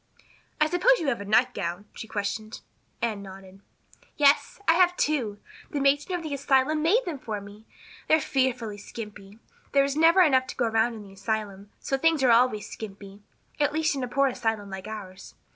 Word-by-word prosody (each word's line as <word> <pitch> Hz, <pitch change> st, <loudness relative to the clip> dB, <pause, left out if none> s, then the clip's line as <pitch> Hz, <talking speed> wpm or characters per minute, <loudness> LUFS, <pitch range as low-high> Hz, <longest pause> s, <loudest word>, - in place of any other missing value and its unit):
"I 305 Hz, -, +5 dB
suppose 360 Hz, +10 st, +4 dB
you 315 Hz, -8 st, -1 dB
have 235 Hz, -6 st, -2 dB
a -, -, -6 dB
nightgown?" 205 Hz, -4 st, 0 dB
she 225 Hz, -, -8 dB
questioned. 215 Hz, +1 st, -4 dB, 0.4 s
Anne 215 Hz, -4 st, -1 dB
nodded. 195 Hz, 0 st, -12 dB, 0.6 s
"Yes, 285 Hz, +5 st, +3 dB
I 330 Hz, -, +6 dB
have 355 Hz, +1 st, +3 dB
two. 245 Hz, -9 st, 0 dB, 0.3 s
The 290 Hz, -, -3 dB
matron 285 Hz, +6 st, +2 dB
of 340 Hz, -, -8 dB
the 310 Hz, -2 st, -4 dB
asylum 280 Hz, +2 st, +2 dB
made 415 Hz, +11 st, +3 dB
them 315 Hz, -6 st, -4 dB
for 215 Hz, -4 st, -4 dB
me. 205 Hz, +2 st, -13 dB, 0.4 s
They're 315 Hz, -, +5 dB
fearfully 250 Hz, -7 st, -1 dB
skimpy. 210 Hz, -1 st, -10 dB, 0.4 s
There 275 Hz, -1 st, +5 dB
is 275 Hz, 0 st, -1 dB
never 330 Hz, +4 st, +5 dB
enough 260 Hz, -5 st, +3 dB
to -, -, -7 dB
go 245 Hz, -, 0 dB
around 225 Hz, +1 st, +1 dB
in 210 Hz, -2 st, -10 dB
an 195 Hz, -, -14 dB
asylum, 200 Hz, 0 st, -4 dB
so 270 Hz, -, -2 dB
things 325 Hz, -2 st, +2 dB
are 250 Hz, -, +5 dB
always 230 Hz, -3 st, +3 dB
skimpy 200 Hz, -1 st, -10 dB, 0.4 s
at 290 Hz, 0 st, +2 dB
least 315 Hz, -1 st, +1 dB
in 270 Hz, -2 st, -3 dB
a -, -, -2 dB
poor 275 Hz, +3 st, +2 dB
asylum 225 Hz, -6 st, -2 dB
like 190 Hz, +1 st, -7 dB
ours. 195 Hz, -3 st, -9 dB
240 Hz, 190 wpm, -26 LUFS, 205-290 Hz, 0.6 s, I